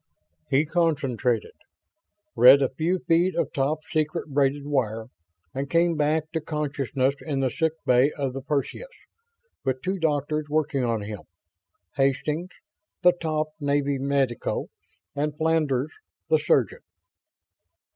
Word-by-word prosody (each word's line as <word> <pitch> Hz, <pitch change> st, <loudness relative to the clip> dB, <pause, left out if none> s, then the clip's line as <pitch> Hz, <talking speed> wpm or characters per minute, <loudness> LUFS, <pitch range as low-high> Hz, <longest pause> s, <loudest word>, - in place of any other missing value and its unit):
He 140 Hz, +3 st, +3 dB
concentrated 140 Hz, -, 0 dB, 0.8 s
read 130 Hz, +4 st, +8 dB
a 130 Hz, -, +1 dB
few 165 Hz, +6 st, 0 dB
feet 175 Hz, +3 st, +3 dB
of -, -, -1 dB
top 145 Hz, +3 st, 0 dB
secret 155 Hz, +1 st, -1 dB
braided 140 Hz, 0 st, +1 dB
wire 115 Hz, -6 st, -1 dB, 0.4 s
and 135 Hz, +1 st, -3 dB
came 170 Hz, 0 st, +3 dB
back 155 Hz, +1 st, 0 dB
to 160 Hz, -, -2 dB
consciousness 140 Hz, -3 st, -1 dB
in 145 Hz, -4 st, -2 dB
the 130 Hz, -2 st, +1 dB
sickbay 150 Hz, -5 st, +2 dB
of 135 Hz, -3 st, -3 dB
the 135 Hz, -, -5 dB
Perseus, 145 Hz, -, -3 dB, 0.7 s
with 130 Hz, -1 st, -2 dB
two 190 Hz, +1 st, -1 dB
doctors 150 Hz, -1 st, 0 dB
working 150 Hz, -3 st, 0 dB
on 115 Hz, -3 st, -1 dB
him; 105 Hz, -1 st, -6 dB, 0.8 s
Hastings, 145 Hz, +5 st, 0 dB, 0.5 s
the 180 Hz, -, +8 dB
top 155 Hz, -3 st, -2 dB
Navy 140 Hz, -1 st, 0 dB
medico, 135 Hz, -3 st, -1 dB, 0.5 s
and 150 Hz, +1 st, -1 dB
Flandres, 155 Hz, -4 st, +1 dB, 0.4 s
the 470 Hz, -, +4 dB
surgeon. 465 Hz, +1 st, +1 dB
145 Hz, 125 wpm, -25 LUFS, 135-160 Hz, 0.8 s, read